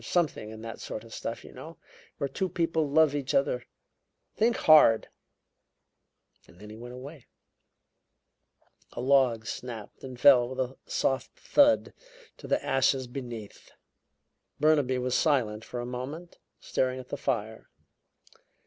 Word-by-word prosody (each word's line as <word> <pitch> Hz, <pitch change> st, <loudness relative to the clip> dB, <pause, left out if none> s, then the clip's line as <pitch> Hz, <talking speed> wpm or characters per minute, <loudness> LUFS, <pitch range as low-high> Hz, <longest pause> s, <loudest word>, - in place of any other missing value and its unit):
There's -, -, -11 dB
something 160 Hz, -11 st, 0 dB
in 110 Hz, 0 st, -10 dB
that 115 Hz, 0 st, -7 dB
sort 110 Hz, -, -6 dB
of 115 Hz, -, -13 dB
stuff, 115 Hz, -, -5 dB
you -, -, -12 dB
know, 155 Hz, +6 st, -10 dB, 0.4 s
where 140 Hz, -, -1 dB
two 190 Hz, +6 st, -2 dB
people 165 Hz, -3 st, 0 dB
love 155 Hz, 0 st, +4 dB
each 145 Hz, -2 st, -2 dB
other. -, -, +1 dB, 0.7 s
Think 230 Hz, +2 st, +2 dB
hard!' 150 Hz, -8 st, +6 dB, 1.4 s
Then 105 Hz, +4 st, -13 dB
he -, -, -9 dB
went 120 Hz, +2 st, -9 dB
away." 135 Hz, +2 st, -11 dB, 1.7 s
A -, -, -7 dB
log 125 Hz, -3 st, +3 dB
snapped 115 Hz, -2 st, -7 dB
and 130 Hz, -2 st, -8 dB
fell 125 Hz, -2 st, +6 dB
with 130 Hz, 0 st, -7 dB
a 130 Hz, 0 st, -2 dB
soft 135 Hz, 0 st, -1 dB
thud 285 Hz, 0 st, +3 dB, 0.4 s
to -, -, -10 dB
the -, -, 0 dB
ashes 135 Hz, 0 st, +2 dB
beneath. 120 Hz, -4 st, -9 dB, 0.9 s
Burnaby 145 Hz, -4 st, +3 dB
was 125 Hz, 0 st, -2 dB
silent 115 Hz, -9 st, +1 dB
for 120 Hz, -, -6 dB
a 120 Hz, -, -4 dB
moment, 135 Hz, +8 st, -7 dB, 0.2 s
staring 130 Hz, 0 st, -1 dB
at 130 Hz, -, -11 dB
the -, -, -3 dB
fire. 110 Hz, -5 st, -3 dB
130 Hz, 140 wpm, -28 LUFS, 120-150 Hz, 1.7 s, hard